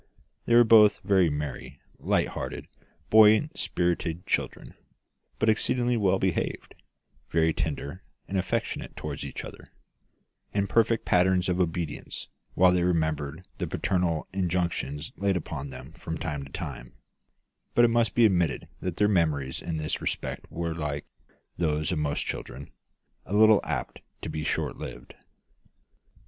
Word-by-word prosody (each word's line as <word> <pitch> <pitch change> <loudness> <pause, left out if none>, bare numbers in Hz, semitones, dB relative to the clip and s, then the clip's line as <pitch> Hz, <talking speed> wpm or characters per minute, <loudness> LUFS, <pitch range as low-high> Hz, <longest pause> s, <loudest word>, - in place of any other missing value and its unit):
They 120 - +4
were 120 - +9
both 110 -2 +6
very 95 -3 +4
merry, 70 -2 -5 0.2
light - - +1
hearted, - - -5 0.4
buoyant 110 +8 +6
spirited 85 0 -1
children, - - -2 0.6
but - - 0
exceedingly 120 +3 +2
well 95 -4 +2
behaved, 95 -3 -2 0.6
very 80 0 +2
tender 75 +4 -3 0.3
and 100 - -5
affectionate 95 -1 -2
toward - - -5
each - - -6
other; - - -12 0.8
and 100 -1 +1
perfect 115 +2 +2
patterns 90 0 +3
of 90 0 0
obedience 85 -3 -3 0.3
while 90 0 +6
they 90 -1 +2
remembered 80 -2 -1
the - - -1
parental 90 -4 0
injunctions 85 -5 -1
laid 100 -1 +1
upon 70 -4 -5
them 65 - -9
from 80 0 -6
time 75 -3 -3
to 70 - -14
time; - - -6 0.8
but 120 - +7
it - - +4
must 115 -1 +1
be 120 - +6
admitted 90 -6 +1
that 90 -2 -4
their 105 - +4
memories 75 -9 +1
in 85 -2 -3
this 75 -1 -2
respect - - -4
were, 85 0 -2
like 75 -3 -3 0.5
those 75 -2 0
of 85 - 0
most 75 -1 -1
children, 70 +1 -6 0.6
a 100 - -2
little 110 0 +6
apt - - -4 0.2
to - - -3
be 75 - -3
short - - -1
lived. - - -8
90 Hz, 145 wpm, -27 LUFS, 75-100 Hz, 0.8 s, were